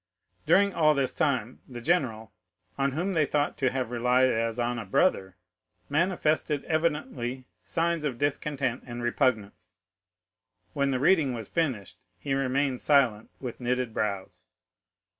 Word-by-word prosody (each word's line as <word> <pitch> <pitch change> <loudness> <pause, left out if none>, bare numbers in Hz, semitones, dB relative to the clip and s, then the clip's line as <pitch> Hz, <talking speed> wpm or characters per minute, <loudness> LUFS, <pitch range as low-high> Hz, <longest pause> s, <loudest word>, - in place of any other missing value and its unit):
During 200 0 +4
all 155 -2 +4
this 130 -2 0
time, 130 -4 -1
the 120 -2 -7
general, 120 - 0 0.4
on 140 -1 0
whom 180 +6 -1
they 155 -4 +2
thought 145 -1 0
to 130 - +2
have 130 -2 -3
relied 125 +2 +3
as 115 0 -1
on 120 0 -1
a - - -4
brother, 95 - +1 0.5
manifested 155 -2 +1
evidently 150 -6 -2 0.2
signs 165 - 0
of 135 -5 -2
discontent 140 -2 -1
and 120 0 -6
repugnance. 115 -7 -1 1.0
When 140 0 +1
the 130 -2 0
reading 145 -4 +3
was 110 -3 -6
finished, 130 - -2 0.2
he 135 +9 -3
remained 135 -1 0
silent, 130 -7 +3
with 125 -3 -6
knitted 125 -1 -1
brows. 100 - -3
130 Hz, 140 wpm, -27 LUFS, 120-150 Hz, 1.0 s, During